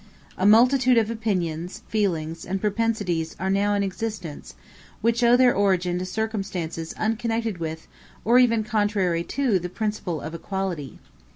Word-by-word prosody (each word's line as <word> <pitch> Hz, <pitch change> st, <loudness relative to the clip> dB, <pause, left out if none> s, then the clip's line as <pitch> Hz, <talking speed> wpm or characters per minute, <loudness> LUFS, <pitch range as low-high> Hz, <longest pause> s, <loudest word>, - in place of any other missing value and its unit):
A 190 Hz, -, +1 dB
multitude 250 Hz, +3 st, +5 dB
of 225 Hz, 0 st, +2 dB
opinions, 180 Hz, -6 st, -3 dB
feelings, 165 Hz, -6 st, -1 dB
and 190 Hz, +2 st, -3 dB
propensities 205 Hz, -6 st, -1 dB
are 190 Hz, 0 st, -1 dB
now 205 Hz, +1 st, +2 dB
in 200 Hz, -, +1 dB
existence, 190 Hz, -, -5 dB, 0.5 s
which 230 Hz, +2 st, +1 dB
owe 240 Hz, +1 st, +6 dB
their 250 Hz, -1 st, +5 dB
origin 185 Hz, -3 st, +1 dB
to 185 Hz, -, -4 dB
circumstances 190 Hz, -7 st, -3 dB
unconnected 225 Hz, -2 st, -1 dB
with 160 Hz, -1 st, -5 dB, 0.4 s
or 240 Hz, +4 st, +6 dB
even 230 Hz, -3 st, +3 dB
contrary 205 Hz, -6 st, 0 dB
to 255 Hz, -9 st, +1 dB
the 180 Hz, +1 st, -5 dB
principle 210 Hz, -5 st, -3 dB
of 155 Hz, +3 st, -7 dB
equality. 170 Hz, -, -4 dB
200 Hz, 145 wpm, -24 LUFS, 175-225 Hz, 0.5 s, owe